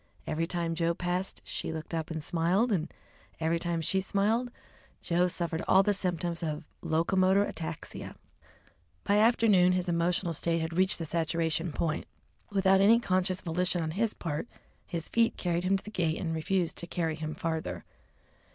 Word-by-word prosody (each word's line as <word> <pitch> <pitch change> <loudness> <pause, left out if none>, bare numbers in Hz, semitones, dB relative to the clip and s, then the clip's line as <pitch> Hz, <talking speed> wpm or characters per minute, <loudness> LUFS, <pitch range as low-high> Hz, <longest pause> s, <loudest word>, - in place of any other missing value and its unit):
Every 165 +2 -1
time 170 -1 -1
Joe 170 0 0
passed 180 +2 -2
she - - -4
looked 160 +1 -6
up 160 0 -2
and 160 -2 -4
smiled, 175 +9 +2
and 170 -5 0 0.5
every 165 +1 +1
time 170 -1 -1
she 190 +4 +1
smiled 215 +6 +1 0.5
Joe 175 +1 +2
suffered 170 -2 -1
all 190 +1 +6
the 205 +1 +2
symptoms 175 -3 -1
of 155 -1 -3 0.2
locomotor 185 +4 +3
ataxia! 165 -4 -6 0.9
By 205 - +2
afternoon 210 -5 +5
his 180 0 0
emotional 175 0 +1
nature 165 0 +2
had 160 0 -3
reached 185 +1 +3
the 165 - -4
saturation 165 0 -1
point. 160 +1 -2 0.4
Without 195 -1 +4
any 225 +4 +6
conscious 185 -3 0
volition 180 0 +1
on 160 - -2
his 220 +5 -1
part, 160 +5 -3 0.4
his 170 -3 -4
feet 230 0 +2
carried 175 0 -1
him 195 +1 +3
to - - -10
the 210 - -8
gate 165 -5 0
and 165 -3 -2
refused 175 +2 -1
to 170 - -5
carry 165 -2 -1
him 155 0 -5
farther. 160 -1 -3
175 Hz, 170 wpm, -30 LUFS, 165-190 Hz, 0.9 s, all